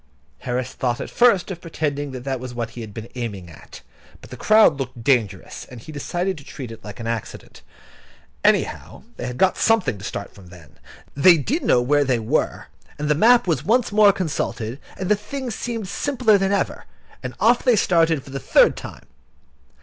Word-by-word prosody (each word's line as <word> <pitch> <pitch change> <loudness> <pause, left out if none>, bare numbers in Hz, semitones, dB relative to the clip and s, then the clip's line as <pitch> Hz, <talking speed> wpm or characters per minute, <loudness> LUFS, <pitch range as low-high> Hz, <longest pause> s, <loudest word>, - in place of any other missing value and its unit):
Harris 125 0 -3
thought 120 -2 -2
at - - -6
first 220 -6 +3
of 175 -2 -7
pretending 145 -3 -3
that 130 -2 -7
that 135 -1 -3
was 125 -1 -8
what 120 -1 -4
he 120 - -8
had 110 -2 -8
been 110 +2 -8
aiming 105 -8 -6
at; 80 - -13 0.4
but - - -15
the - - -6
crowd 215 -9 +4
looked 130 -3 -6
dangerous, 120 -7 0
and 125 - -10
he 155 - -10
decided 175 +4 -3
to - - -13
treat 130 -4 -8
it 115 - -10
as 105 - -7
an 115 - -7
accident. 115 -2 -6 0.8
Anyhow, - - 0
they - - -4
had 125 0 -6
got 190 +6 +3
something 220 - +2
to - - -11
start 100 0 -6
from 95 -3 -15
then. 85 -4 -16 0.3
They 170 +5 +6
did 265 - -1
know 120 - +3
where 145 +3 +3
they 130 -3 +1
were, 110 -1 -1 0.3
and 150 0 -3
the - - +5
map 230 +10 +5
was 160 -6 0
once 230 +6 +2
more 205 -1 +6
consulted, 140 - -3 0.2
and 190 - -4
the 210 - +4
thing 250 +5 -6
seemed 225 -2 -4
simpler 240 -3 +2
than 195 0 0
ever, 200 - -1 0.4
and 130 -1 -6
off 235 +4 +4
they 250 -3 +4
started 165 -7 +2
for 135 - -13
the 135 - -4
third - - +4
time. - - -10
145 Hz, 200 wpm, -22 LUFS, 120-195 Hz, 0.8 s, They